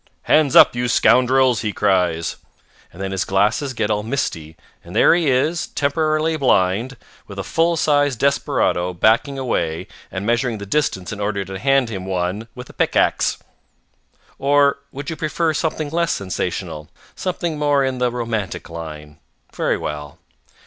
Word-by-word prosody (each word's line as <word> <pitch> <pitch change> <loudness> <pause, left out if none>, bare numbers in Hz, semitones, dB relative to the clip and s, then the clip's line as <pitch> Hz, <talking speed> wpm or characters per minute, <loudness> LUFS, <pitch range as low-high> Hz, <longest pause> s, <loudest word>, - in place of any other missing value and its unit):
"Hands 150 -3 +3
up, - - +8
you 120 0 -1
scoundrels," 130 0 +3
he 105 - -1
cries. 90 -5 0 0.5
And 90 - -15
then 95 0 -3
his 95 -1 -1
glasses 105 +8 0
get 110 -2 -1
all 105 0 0
misty, 80 - -3 0.3
and 85 +4 -11
there - - +6
he 170 -4 +2
is, 150 +7 +1
temporarily 155 +2 0
blind, 115 -1 +1 0.3
with 100 - -10
a 100 - -3
full 165 - +1
size 145 -3 +2
desperado 90 -8 0
backing 115 +9 +2
away 85 -11 -2 0.3
and 95 +2 -4
measuring 120 0 0
the 100 - -7
distance 100 -6 -1
in 100 - -8
order 100 -1 -2
to 95 0 -7
hand 135 0 +2
him 95 -4 -6
one 95 +4 -2
with 125 0 -9
a - - -14
pickaxe. - - +1 1.0
Or 140 0 +3
would 140 +3 -6
you - - -4
prefer 160 +1 -1
something 155 -1 -2
less 170 0 +1
sensational, 80 -5 -4 0.3
something 175 -4 -3
more 145 -2 +2
in 130 -1 -2
the 125 0 +2
romantic 115 -8 -4
line? 75 -2 -8 0.3
Very - - 0
well. 75 -1 -6
120 Hz, 155 wpm, -20 LUFS, 95-145 Hz, 1.0 s, up